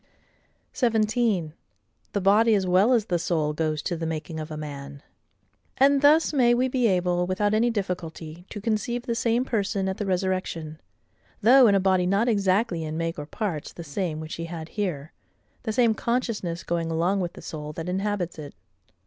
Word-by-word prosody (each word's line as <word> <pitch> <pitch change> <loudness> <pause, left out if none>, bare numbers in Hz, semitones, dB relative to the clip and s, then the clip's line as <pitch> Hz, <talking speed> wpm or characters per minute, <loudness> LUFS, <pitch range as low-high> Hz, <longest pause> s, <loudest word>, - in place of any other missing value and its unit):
17. 220 - +1 0.6
The 200 - 0
body, 215 +4 +5
as 195 -2 +1
well 185 +6 +4
as 230 -4 +3
the 175 -4 0
soul, 160 -3 0
goes 155 -1 -1
to 175 - -2
the 165 -1 -3
making 160 0 -4
of 155 0 -6
a 155 - -6
Man. 140 -1 -8 0.7
And 275 +1 +4
thus 305 +2 +5
may 240 -4 +4
we 255 +2 +2
be 250 -2 +1
able, 180 -2 +1
without 205 +3 0
any 230 +3 +3
difficulty, 175 -5 -4
to 210 - -6
conceive 225 +3 -1
the 235 - -2
same 230 +2 +1
person 200 -4 -1
at 190 - -2
the 205 - -3
resurrection, 185 -4 -2 0.6
though 250 +3 +7
in 200 - +4
a - - +4
body 185 -1 +2
not 200 +5 +2
exactly 195 -4 +1
in 155 0 -4
make 165 -1 -2
or 145 - -6
parts 175 -6 -4
the 170 - -8
same 160 +1 -3
which 155 0 -6
he 165 - -4
had 165 -1 -7
here,—the 185 - -6
same 230 0 +3
consciousness 220 -8 -2
going 170 -1 -2
along 170 +5 +1
with 175 -2 -3
the - - -11
soul 150 -1 -6
that 165 +2 -6
inhabits 190 -2 -2
it. 145 -2 -9
185 Hz, 185 wpm, -25 LUFS, 165-220 Hz, 0.7 s, though